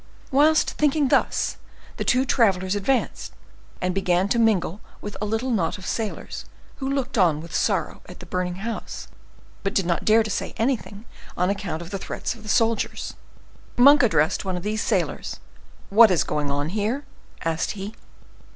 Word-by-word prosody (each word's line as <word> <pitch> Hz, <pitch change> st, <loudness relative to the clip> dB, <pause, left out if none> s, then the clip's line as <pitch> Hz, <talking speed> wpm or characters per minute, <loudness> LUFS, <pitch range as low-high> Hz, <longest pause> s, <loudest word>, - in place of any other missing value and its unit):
Whilst 300 Hz, +4 st, +4 dB
thinking 295 Hz, -2 st, +2 dB
thus, -, -, +1 dB, 0.4 s
the -, -, -2 dB
two 255 Hz, +2 st, +3 dB
travelers 195 Hz, -7 st, +2 dB
advanced, 225 Hz, +6 st, -1 dB, 0.5 s
and 180 Hz, 0 st, -1 dB
began 185 Hz, 0 st, +2 dB
to 235 Hz, -, +2 dB
mingle 210 Hz, -4 st, +2 dB, 0.2 s
with 205 Hz, -, -7 dB
a -, -, 0 dB
little 225 Hz, +5 st, -1 dB
knot 180 Hz, -7 st, 0 dB
of 190 Hz, -, -10 dB
sailors, 220 Hz, -2 st, -4 dB, 0.3 s
who 270 Hz, -1 st, -3 dB
looked 275 Hz, -5 st, -1 dB
on 165 Hz, -5 st, +4 dB
with 165 Hz, +1 st, -10 dB
sorrow -, -, 0 dB
at -, -, -11 dB
the -, -, -10 dB
burning 180 Hz, -1 st, -2 dB
house, 225 Hz, +5 st, -5 dB, 0.5 s
but 195 Hz, -, -2 dB
did 195 Hz, -, +2 dB
not 170 Hz, -1 st, 0 dB
dare 220 Hz, +1 st, +5 dB
to 215 Hz, -, -4 dB
say -, -, -3 dB
anything 225 Hz, -3 st, -2 dB, 0.3 s
on 180 Hz, +2 st, +2 dB
account 195 Hz, -5 st, -4 dB
of 170 Hz, -, -11 dB
the 195 Hz, -, -3 dB
threats -, -, -4 dB
of 230 Hz, -, -14 dB
the 215 Hz, -, -9 dB
soldiers. 225 Hz, 0 st, +1 dB, 0.6 s
Monk 280 Hz, +4 st, +8 dB
addressed 180 Hz, -, +2 dB
one 190 Hz, -2 st, -2 dB
of 175 Hz, -, -6 dB
these 215 Hz, +1 st, -1 dB
sailors:—"What 220 Hz, +2 st, +1 dB
is 180 Hz, -3 st, +3 dB
going 145 Hz, -1 st, -2 dB
on 145 Hz, +2 st, -1 dB
here?" 220 Hz, +9 st, -1 dB, 0.4 s
asked 165 Hz, 0 st, 0 dB
he. 200 Hz, +2 st, -5 dB
205 Hz, 170 wpm, -24 LUFS, 180-235 Hz, 0.6 s, Monk